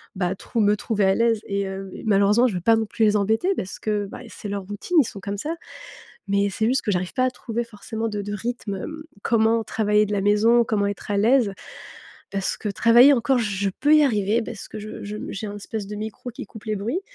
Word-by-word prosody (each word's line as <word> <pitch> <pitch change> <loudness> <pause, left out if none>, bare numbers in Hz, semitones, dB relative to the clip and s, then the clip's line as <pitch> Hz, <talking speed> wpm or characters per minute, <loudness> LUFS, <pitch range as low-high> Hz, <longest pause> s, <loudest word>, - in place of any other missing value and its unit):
bah, 180 -2 0
à 190 - -2
trou 230 +4 -4
me 210 0 +4
trouver 210 -2 0
à 190 - +3
l'aise 230 -2 +2
et 200 0 -1
hem 195 0 -5
et - - -9
malheureusement, 205 +3 +4
je 200 - -3
veux - - -1
pas 225 +4 +5
non 225 0 0
plus 220 +1 0
les 210 0 +3
embêter 220 - +1
parce 185 - -5
que, 210 -2 -1
bah, 245 - -9
et - - -12
c'est 205 - -8
leur 200 -1 -3
routine, 205 - -2
ils 270 - +5
sont 200 - -8
comme 200 0 -4
ça. 315 +10 -3 0.7
Mais 200 0 +2
c'est 220 - -2
juste 260 +3 +2
que 210 - -1
j'arrive 180 -1 -1
pas 255 - +1
à - - +1
trouver 235 -1 -4
forcément 225 +1 -5
de 205 -1 -3
de 205 +1 -5
rythme, 210 -1 -4
hem, 310 +10 -6 0.2
comment 225 0 +3
travailler 210 -1 +2
de 210 - -5
la 200 -1 0
maison? 225 +4 +4
Comment 205 -2 0
être 205 +1 -5
à 200 - +1
l'aise? 230 -1 +3 0.8
Parce 195 -1 -1
que 210 - -4
travailler 240 +7 +6
encore, 255 +1 +2
je 200 -3 -1
peux 295 +2 +5
y 305 - +6
arriver 215 -2 +1
parce 220 -2 -8
que - - -8
je 215 0 -8
je, 210 +1 -5
mmh, - - -6
j'ai 210 +2 -5
un 205 - -6
espèce 205 0 -5
de 210 - -5
micro 220 +3 -6
qui 235 - -8
coupe 220 -1 -13
les 215 -1 -1
bruits. 235 - -2
210 Hz, 255 wpm, -23 LUFS, 200-230 Hz, 0.8 s, travailler